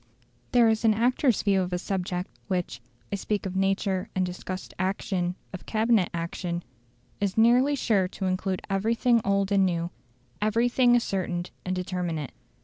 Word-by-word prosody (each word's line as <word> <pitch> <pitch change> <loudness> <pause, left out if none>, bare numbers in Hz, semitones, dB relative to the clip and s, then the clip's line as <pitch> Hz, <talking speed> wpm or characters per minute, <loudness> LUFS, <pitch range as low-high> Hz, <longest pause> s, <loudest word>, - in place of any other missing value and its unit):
There 240 -2 +5
is 220 0 +1
an 220 -2 +4
actor's 245 +1 +2
view 195 -2 +3
of 180 0 -3
a 180 - 0
subject, 180 -1 -3 0.2
which 180 - -2 0.3
(I - - 0
speak 205 +1 -2
of 190 -1 -4
mature 195 0 0
and 185 -1 +2
discussed 185 +1 -6
action 185 -1 -1 0.2
of 185 - -8
Cabinet 220 -4 +2
action) 170 +1 -3 0.6
is 200 0 -1
nearly 245 +5 +5
sure 210 -8 +2
to 190 +1 -5
include 185 0 -1
everything 225 +4 +2
old 200 0 +1
and 200 -1 +4
new 170 -2 0 0.5
everything 240 +3 +3
ascertained 185 -6 -1
and 185 0 -2
determinate. 175 -5 -3
195 Hz, 150 wpm, -27 LUFS, 180-220 Hz, 0.6 s, There